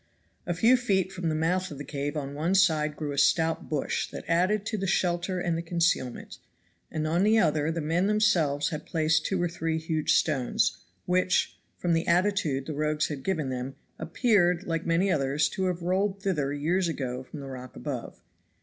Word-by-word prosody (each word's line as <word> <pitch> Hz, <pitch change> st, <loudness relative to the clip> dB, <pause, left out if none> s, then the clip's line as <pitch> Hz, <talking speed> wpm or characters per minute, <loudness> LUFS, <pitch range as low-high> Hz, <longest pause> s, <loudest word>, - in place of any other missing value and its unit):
A 175 Hz, -, -1 dB
few 230 Hz, +8 st, +5 dB
feet 195 Hz, -6 st, 0 dB
from 180 Hz, -3 st, -3 dB
the 155 Hz, -, -1 dB
mouth 180 Hz, +4 st, 0 dB
of 145 Hz, -, -8 dB
the 145 Hz, -, -6 dB
cave 145 Hz, +1 st, -4 dB
on 140 Hz, -1 st, -4 dB
one 165 Hz, +6 st, 0 dB
side 155 Hz, -6 st, +3 dB
grew 150 Hz, -2 st, -4 dB
a 140 Hz, -, -1 dB
stout 160 Hz, +2 st, +2 dB
bush 150 Hz, -3 st, -1 dB
that -, -, -8 dB
added 185 Hz, +5 st, +2 dB
to 220 Hz, -, -2 dB
the 195 Hz, -2 st, -2 dB
shelter 180 Hz, 0 st, 0 dB
and 175 Hz, -2 st, 0 dB
the 165 Hz, -, -2 dB
concealment, 170 Hz, -7 st, -1 dB, 0.5 s
and 155 Hz, -1 st, -3 dB
on 165 Hz, +3 st, +1 dB
the 215 Hz, +3 st, +4 dB
other 155 Hz, -5 st, +2 dB
the 165 Hz, 0 st, -3 dB
men 165 Hz, +5 st, +1 dB
themselves 180 Hz, -10 st, +2 dB
had 155 Hz, -3 st, -6 dB
placed 160 Hz, -1 st, +1 dB
two 190 Hz, -, -1 dB
or 175 Hz, -, +1 dB
three 165 Hz, -1 st, -2 dB
huge 160 Hz, -1 st, 0 dB
stones, 135 Hz, -6 st, +1 dB, 0.3 s
which, 185 Hz, 0 st, +1 dB, 0.2 s
from 175 Hz, -1 st, 0 dB
the 165 Hz, +1 st, 0 dB
attitude 170 Hz, -7 st, +1 dB
the 155 Hz, -, -4 dB
rogues 150 Hz, +1 st, 0 dB
had 145 Hz, -3 st, -5 dB
given 160 Hz, -5 st, -1 dB
them, 130 Hz, +1 st, -4 dB, 0.2 s
appeared, 180 Hz, -, +2 dB
like 165 Hz, -2 st, -3 dB
many 175 Hz, +4 st, +2 dB
others, 145 Hz, -1 st, +1 dB
to 190 Hz, -2 st, -2 dB
have 180 Hz, -2 st, -2 dB
rolled 190 Hz, +3 st, 0 dB
thither 150 Hz, -8 st, 0 dB
years 170 Hz, +6 st, 0 dB
ago 130 Hz, -6 st, -3 dB
from 140 Hz, +3 st, -10 dB
the 140 Hz, -, -7 dB
rock 130 Hz, -1 st, -9 dB
above. -, -, -6 dB
165 Hz, 195 wpm, -27 LUFS, 150-185 Hz, 0.5 s, few